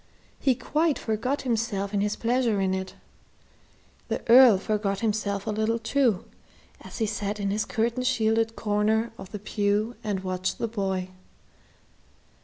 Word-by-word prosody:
He 265 -3 +2
quite 310 +4 0
forgot 230 +6 -2
himself 220 -5 -1
in 200 - +1
his 210 +1 0
pleasure 235 -3 +1
in 190 -1 +1
it. 190 0 -4 1.1
The - - -4
Earl 240 -3 +8
forgot 200 -1 -1
himself 205 -3 -1
a 220 - -1
little 220 +2 0
too, 230 -3 +1 0.6
as - - -10
he 225 - +1
sat 210 -1 -3
in 200 -1 -1
his 210 +1 0
curtain 235 +3 -1
shielded 225 -2 +1
corner 220 +2 +1
of 190 - -9
the 210 - -4
pew 210 +2 -1
and 205 -3 -2
watched 185 0 -2
the 230 - -1
boy. 190 -4 -2
215 Hz, 150 wpm, -26 LUFS, 200-230 Hz, 1.1 s, Earl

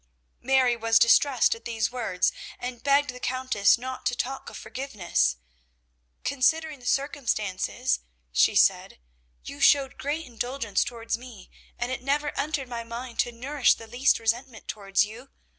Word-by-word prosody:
Mary 260 -2 +3
was 225 0 +3
distressed 235 +2 +5
at 230 - -11
these 225 -2 -1
words, 225 -8 0 0.3
and 245 -1 -6
begged 280 0 +3
the 250 - -11
Countess 255 -5 +2
not 255 +2 -6
to 245 - 0
talk 265 +2 -4
of - - -9
forgiveness. 195 - -1 0.9
"Considering 290 +3 +1
the 245 - -10
circumstances," 215 - -1 0.3
she - - +3
said, - - +3 0.5
"you 140 - -9
showed 280 -1 +4
great 300 +4 -2
indulgence 245 -3 -1
towards 230 -1 -4
me, 240 -7 -12 0.3
and 240 +1 -2
it 255 - -3
never 290 +3 0
entered 285 -2 -2
my 235 -1 -5
mind 235 +1 -8
to 240 - +2
nourish 260 +3 +2
the 225 - -11
least 245 +5 +2
resentment 230 +1 -2
towards 200 -1 +1
you. 235 +6 -11
245 Hz, 150 wpm, -26 LUFS, 225-270 Hz, 0.9 s, distressed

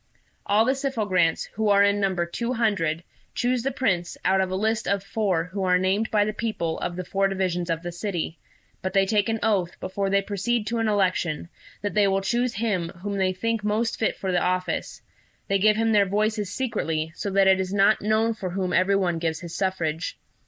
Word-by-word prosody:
All 215 +2 +4
the 260 - +3
Syphogrants, 210 -11 0
who 215 0 0
are 200 0 +6
in 200 0 +3
number 190 -3 +1
two 235 +8 -3
hundred, 195 -9 0 0.3
choose 250 0 +1
the 265 - 0
Prince 190 -10 -1
out 190 0 +3
of 190 - 0
a 185 - -2
list 220 +3 0
of 200 -1 0
four 195 -5 0
who 190 +3 -5
are 180 -1 +4
named 190 +4 +1
by 210 -1 +3
the 215 - -2
people 210 -8 -2
of 175 - -3
the 180 0 -5
four 195 +2 +1
divisions 185 -3 -1
of 165 0 -1
the 175 - -4
city; 175 -3 -4 0.4
but 185 0 -3
they 195 -1 +4
take 205 +1 +1
an 225 - +1
oath, 195 -6 0
before 195 +1 -2
they 200 0 +2
proceed 210 +3 -1
to 230 +2 -1
an 225 - +1
election, 185 -6 0 0.3
that 205 - -2
they 210 -1 +4
will 195 0 +1
choose 240 +5 0
him 195 -6 -1
whom 200 -1 -2
they 190 -1 +2
think 225 +3 -2
most 220 +2 0
fit 220 - +1
for 190 - -2
the 180 - +2
office: 185 0 -2 0.4
they 195 0 +2
give 215 +2 +4
him 225 +1 +1
their 205 -2 +4
voices 210 +1 0
secretly, 160 -11 -2
so 200 - -4
that 195 0 +3
it 190 0 +5
is 190 0 -2
not 200 +2 +4
known 220 +2 +2
for 195 -4 -5
whom 185 0 -2
every 190 +2 +3
one 175 -4 +1
gives 165 -1 -2
his 170 -1 -8
suffrage. 170 -4 -2
195 Hz, 215 wpm, -25 LUFS, 185-215 Hz, 0.4 s, are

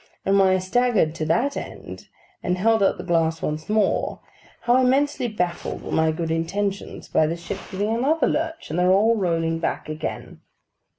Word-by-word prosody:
And 195 +1 +3
when 195 - +5
I 185 0 +3
staggered 190 -3 +1
to 160 -1 -3
that 240 - +1
end, - - -8 0.3
and 180 +1 -1
held 220 +3 +3
out 195 - +3
the - - -6
glass 165 -2 +1
once 155 +2 -3
more, 215 -1 +1 0.4
how 240 +1 +3
immensely 270 0 +2
baffled 180 -6 -3
were - - -7
my 160 0 +2
good 160 0 -3
intentions 195 +5 -3
by 155 - +2
the 165 +2 -2
ship 190 +3 -6
giving 205 +3 -1
another 290 +7 +2
lurch, 320 - -2
and 165 - -1
their 180 +1 +4
all 215 +4 +4
rolling 165 -4 0
back 165 - -3
again! 155 0 -6
190 Hz, 180 wpm, -23 LUFS, 165-225 Hz, 0.4 s, when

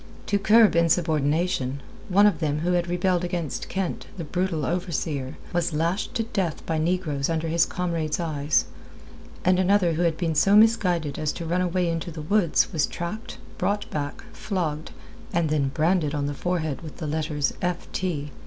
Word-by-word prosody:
To 205 - +1
curb 215 0 +5
insubordination, 160 -3 +1 0.3
one 200 +2 +5
of 210 - +3
them 150 -2 -1
who 175 +2 0
had 175 -1 +1
rebelled 180 0 +1
against 175 -5 -3
Kent, 190 -2 -3
the 170 - -4
brutal 170 -2 -1
overseer, 155 -5 -2 0.2
was 175 -1 0
lashed 170 +6 -1
to 225 - +1
death 195 -8 -2
by 160 -1 -1
negroes 155 -4 0
under 165 0 -1
his 165 +1 +3
comrades' 170 -3 -2
eyes, 155 -3 +1 0.8
and 185 0 +4
another 185 -2 +3
who 160 - -1
had 165 -2 +1
been 165 -3 0
so 195 +6 +4
misguided 180 -9 +3
as 155 -1 0
to 170 - -6
run 175 +3 0
away 180 0 +1
into 165 +1 -2
the 155 -2 -7
woods 190 +1 +2
was 155 -3 +2
tracked, 210 +7 -6 0.2
brought 205 0 0
back, 145 -1 -4
flogged, 160 -6 -3 0.4
and 165 -2 +1
then 145 -3 +2
branded 155 +1 +1
on 145 -1 -1
the 145 - -2
forehead 160 -2 -2
with 155 -3 -9
the 160 - -5
letters 150 -1 -1
"F. 175 0 -2
T. 150 -6 -2
170 Hz, 175 wpm, -25 LUFS, 155-180 Hz, 0.8 s, curb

